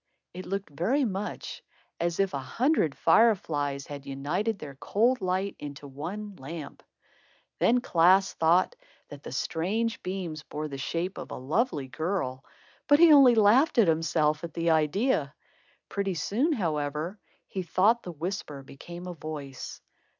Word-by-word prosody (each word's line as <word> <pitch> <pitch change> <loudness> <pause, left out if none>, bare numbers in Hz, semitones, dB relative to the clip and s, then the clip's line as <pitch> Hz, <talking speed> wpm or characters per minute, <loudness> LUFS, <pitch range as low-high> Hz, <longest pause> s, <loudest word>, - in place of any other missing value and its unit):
It 185 +1 -8
looked 195 -3 -4
very 235 - +1
much 200 -2 -4 0.4
as 170 +1 -1
if 195 -4 +1
a 140 - -1
hundred 230 - +1
fire 225 -1 +5
flies 145 -6 -3
had 140 -1 -9
united 165 +11 -2
their 150 -6 -8
cold 230 - +1
light 185 +2 -1
into 145 0 -8
one 185 +9 -6
lamp. 150 +2 -8 0.8
Then 245 +1 +3
Klaas 185 -1 +4
thought 170 +3 +3 0.3
that 145 -1 -10
the - - -8
strange 210 - -1
beams 180 -5 -4
bore 150 +2 -5
the 140 -2 -7
shape 170 +7 -3
of - - -7
a - - -6
lovely 150 - -1
girl, 155 -3 -3 0.4
but 290 - +6
he 330 -1 +8
only 265 -4 +8
laughed 230 +9 +4
at 225 -5 +6
himself 155 -1 +1
at 170 - -7
the 165 0 +1
idea. 160 - +1 0.5
Pretty 195 -2 -2
soon, 245 - 0
however, 155 - -2 0.3
he 190 - -4
thought 200 +7 +3
the 180 - -7
whisper 160 -3 -5
became 170 +6 -10
a 180 - -5
voice. 150 -5 -7
170 Hz, 150 wpm, -28 LUFS, 150-205 Hz, 0.8 s, he